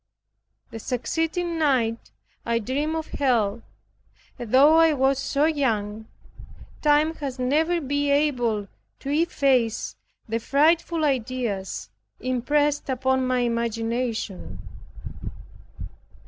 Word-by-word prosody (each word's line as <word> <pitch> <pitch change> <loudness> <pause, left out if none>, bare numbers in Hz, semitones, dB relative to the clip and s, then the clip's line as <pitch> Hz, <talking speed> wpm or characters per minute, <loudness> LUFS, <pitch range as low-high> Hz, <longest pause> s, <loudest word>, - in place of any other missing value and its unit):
The 225 - -7
succeeding 325 +8 -2
night 245 -7 +1 0.3
I 235 0 0
dreamed 280 +8 -2
of 320 -1 -3
Hell, 235 -5 +1 0.8
and 235 -3 -6
though 290 +5 +6
I 325 -1 +5
was 270 -1 +2
so 280 +2 +1
young, 220 -8 -1 0.7
time 300 +1 +3
has 275 -3 -5
never 310 +7 +1
been 285 0 -1
able 245 -8 +1 0.3
to 275 - -5
efface 275 -7 +1 0.3
the 225 +1 -1
frightful 315 +5 +2
ideas 235 - -2 0.3
impressed 290 +4 0
upon 260 0 +1
my 255 -1 +1
imagination. 230 -2 -3
260 Hz, 100 wpm, -24 LUFS, 230-295 Hz, 0.8 s, though